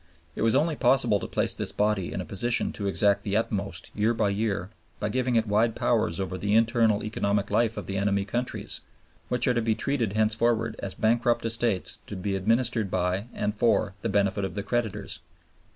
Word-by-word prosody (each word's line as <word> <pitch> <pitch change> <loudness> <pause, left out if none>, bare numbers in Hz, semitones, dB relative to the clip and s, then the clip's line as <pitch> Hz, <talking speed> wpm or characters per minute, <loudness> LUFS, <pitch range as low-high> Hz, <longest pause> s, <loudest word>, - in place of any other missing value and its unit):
It - - -5
was 115 +2 +3
only 155 +3 +2
possible 120 -6 +3
to - - -5
place - - 0
this - - -2
body 105 -3 0
in 95 - -3
a - - -6
position 120 +4 0
to 100 - -4
exact 100 0 +3
the 100 0 0
utmost 100 -5 -3
year 110 +3 +1
by 110 -2 +1
year 100 -2 -2 0.3
by 105 - -1
giving 125 +1 0
it 115 -1 +3
wide 110 +2 +2
powers 85 - +1
over 95 -1 -3
the 105 +1 +1
internal 115 -2 +3
economic 100 -1 -1
life 115 -1 +2
of - - -4
the 95 - -3
enemy 100 0 +1
countries, 120 +4 -3 0.5
who - - 0
are - - +2
to 125 -1 +2
be 110 -1 +1
treated 120 -4 -1
henceforward 110 +1 +1
as 95 - -4
bankrupt 120 +1 +1
estates 115 -4 0
to - - -6
be 95 +1 -2
administered 115 +2 +1
by 90 +2 -1
and 105 0 -2
for 110 -4 +2
the 115 - -2
benefit 100 0 +1
of 95 - -4
the 100 - -3
creditors. 115 0 -3
110 Hz, 200 wpm, -27 LUFS, 100-115 Hz, 0.5 s, was